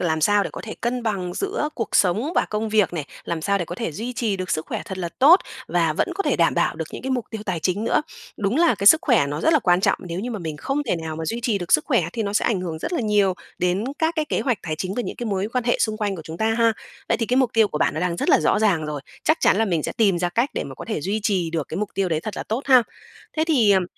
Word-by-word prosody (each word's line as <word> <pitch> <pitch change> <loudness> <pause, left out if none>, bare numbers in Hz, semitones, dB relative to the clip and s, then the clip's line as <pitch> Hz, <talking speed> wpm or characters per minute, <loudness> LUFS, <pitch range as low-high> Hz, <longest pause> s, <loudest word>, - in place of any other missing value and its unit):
Làm 160 -2 0
sao 205 +5 +4
để - - -4
có - - -7
thể 220 - -6
cân 245 +1 -1
bằng 190 -6 -2
giữa 395 -6 -2
cuộc 230 -4 -3
sống 215 - +2
và - - +3
công 215 +1 -1
việc 210 -4 +2
này? 155 -4 -3 0.2
Làm 165 -2 -3
sao 200 +1 +1
để 175 - -2
có 175 - -7
thể 185 -6 -4
duy 235 +9 -5
trì 220 -5 -1
được 185 -1 -5
sức 155 -1 -1
khỏe - - -4
thật 190 -1 -6
là 175 - -2
tốt 325 +8 +7 0.3
và 165 -2 +2
vẫn - - 0
có 395 - -1
thể - - +1
đảm - - +3
bảo - - +1
được - - -3
những - - -7
cái 265 - -3
mục 250 -4 -1
tiêu 220 -2 -6
tài 180 -4 -2
chính 195 +6 -1
nữa? - - +2 0.3
Đúng 205 +5 -1
là 335 -7 +4
cái 200 +1 -4
sức 315 - +9
khỏe 240 - +3
nó 145 +2 -4
rất 325 - +3
là 310 - +5
quan 180 -7 +3
trọng, - - +2
nếu 175 0 -5
như 245 +4 -4
mà 220 - -4
mình 160 -4 -5
không 275 - -2
thể 235 -10 -1
nào 160 -1 -5
mà 160 - -4
duy 230 +7 -3
trì 230 -4 0
được 175 -2 -3
sức 150 - +5
khỏe - - +2
thì 225 - -2
nó 200 - -3
sẽ 210 - +1
ảnh 205 -6 +1
hưởng 165 -3 -4
rất 335 - -4
là 335 - 0
nhiều 205 -4 +2 0.2
đến 180 +4 0
các 320 +1 +1
cái 310 - +1
kế - - -1
hoạch 250 -6 0
tài 155 -2 -3
chính 185 +4 -3
và 245 - -1
những - - -6
cái 240 - -4
mối 200 0 -1
quan 250 -2 0
hệ 240 - +1
xung 215 -1 +1
quanh 205 -3 -2
của 160 - -8
chúng 160 +1 -7
ta 220 +3 +1
ha. 230 0 +3 0.4
Vậy - - +2
thì 230 - -1
cái 250 - +1
mục 260 -3 +3
tiêu 220 -2 +4
của 150 - -3
bạn - - +1
nó 155 - -2
đang 175 -1 -1
rất - - -2
là - - +5
rõ 155 - +2
ràng 195 -8 +2
rồi, 150 -2 -4 0.2
chắc 315 - +4
chắn - - +4
là 225 - +3
mình 170 -7 0
sẽ - - -3
tìm 195 -6 +2
ra 175 0 0
cách 235 - 0
để - - -2
mà - - -8
có - - -9
thể 215 - -2
duy 200 +7 -2
trì 185 -6 0
được 160 -3 -3
cái - - -5
mục 210 - -2
tiêu 195 -1 0
đấy 160 -2 0
thật 215 +4 -6
là - - -3
tốt 230 +6 -3
ha. 255 -3 +7 0.5
Thế 315 - +2
thì, 240 -11 +4
ừm, 190 -2 +3
205 Hz, 330 wpm, -23 LUFS, 175-235 Hz, 0.5 s, sức